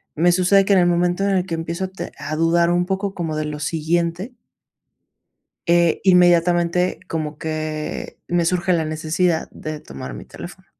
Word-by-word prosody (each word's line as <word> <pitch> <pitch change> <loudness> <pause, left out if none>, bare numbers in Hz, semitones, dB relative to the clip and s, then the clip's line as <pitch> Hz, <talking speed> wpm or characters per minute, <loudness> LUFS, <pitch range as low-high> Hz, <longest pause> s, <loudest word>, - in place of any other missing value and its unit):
me 175 +3 +4
sucede 185 +2 +4
que, 200 - +3
en 190 - +5
el 175 - +4
momento 175 +2 +1
en 200 - +1
el 185 -1 +1
que 170 -3 -3
empiezo 170 +3 -3
a - - -4
te 190 +1 -7
a 155 - -4
dudar 170 +2 +3
un 175 0 +2
poco 195 +1 -2
como 165 -3 -3
de 155 0 -2
lo 150 0 -5
siguiente 170 - -1 1.3
eh, 170 -1 +3
inmediatamente 175 -1 +3
como 155 -2 -4
que, 155 -1 -4
me 175 -1 +1
surge 180 +1 +1
la 165 -2 +1
necesidad 160 +2 0
de 155 -1 -7
tomar 65 0 -8
mi - - -9
teléfono. - - -11
170 Hz, 180 wpm, -21 LUFS, 160-180 Hz, 1.3 s, en